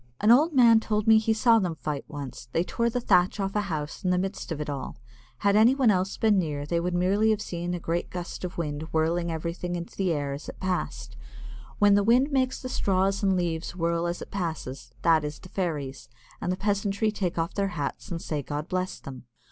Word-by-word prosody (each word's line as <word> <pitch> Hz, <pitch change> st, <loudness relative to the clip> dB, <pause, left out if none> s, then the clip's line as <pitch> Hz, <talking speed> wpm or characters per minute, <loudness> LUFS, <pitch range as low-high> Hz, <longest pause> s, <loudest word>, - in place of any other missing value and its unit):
An 210 Hz, +2 st, +5 dB
old 300 Hz, +8 st, +6 dB
man 235 Hz, -5 st, +6 dB
told 215 Hz, -1 st, -1 dB
me 220 Hz, -1 st, +7 dB
he 220 Hz, 0 st, 0 dB
saw 225 Hz, +1 st, +5 dB
them 180 Hz, -5 st, -1 dB
fight 150 Hz, -1 st, -4 dB
once; 140 Hz, -5 st, -7 dB
they 165 Hz, -, +2 dB
tore 235 Hz, +5 st, 0 dB
the 245 Hz, -, -1 dB
thatch 185 Hz, -4 st, +3 dB
off 195 Hz, 0 st, -2 dB
a 210 Hz, -, +2 dB
house 160 Hz, -3 st, -4 dB
in 185 Hz, -, +1 dB
the 180 Hz, -, +3 dB
midst 190 Hz, 0 st, -3 dB
of 155 Hz, -, -3 dB
it 150 Hz, -, -3 dB
all. 140 Hz, -6 st, -5 dB, 0.4 s
Had 200 Hz, 0 st, +2 dB
anyone 240 Hz, +2 st, +5 dB
else 190 Hz, 0 st, 0 dB
been 215 Hz, -3 st, +3 dB
near 145 Hz, -4 st, -2 dB
they 170 Hz, +3 st, 0 dB
would 175 Hz, +1 st, -1 dB
merely 195 Hz, +5 st, +2 dB
have 215 Hz, -1 st, +2 dB
seen 175 Hz, -2 st, -3 dB
a -, -, -4 dB
great 170 Hz, +1 st, -2 dB, 0.5 s
wind 150 Hz, -3 st, -3 dB
whirling 165 Hz, +2 st, +1 dB
everything 170 Hz, +2 st, -3 dB
into 170 Hz, 0 st, -6 dB
the 190 Hz, -3 st, 0 dB
air 145 Hz, -3 st, -1 dB
as 140 Hz, +2 st, -7 dB
it -, -, -10 dB
passed. 185 Hz, -1 st, -3 dB, 0.6 s
When 205 Hz, -1 st, +5 dB
the 200 Hz, 0 st, +4 dB
wind 250 Hz, +7 st, +4 dB
makes 260 Hz, -2 st, +1 dB
the 255 Hz, -, -6 dB
straws 195 Hz, -4 st, +1 dB
and 195 Hz, -2 st, +2 dB
leaves 170 Hz, -1 st, -2 dB
whirl 170 Hz, -1 st, 0 dB
as 175 Hz, +1 st, -3 dB
it -, -, -14 dB
passes, 155 Hz, -9 st, -4 dB
that 160 Hz, -2 st, +4 dB
is 150 Hz, 0 st, -4 dB
the 185 Hz, -, -14 dB
fairies, 145 Hz, -, -3 dB, 0.3 s
and 180 Hz, -, -1 dB
the 185 Hz, -, -2 dB
peasantry 200 Hz, +1 st, 0 dB
take 185 Hz, -5 st, -2 dB
off 165 Hz, +2 st, -1 dB
their 200 Hz, -1 st, 0 dB
hats 145 Hz, -, -4 dB
and 170 Hz, -3 st, -3 dB
say, 150 Hz, -3 st, -3 dB
"God 145 Hz, +3 st, -4 dB
bless 185 Hz, -1 st, -2 dB
them." 130 Hz, -2 st, -10 dB
180 Hz, 220 wpm, -27 LUFS, 160-205 Hz, 0.6 s, me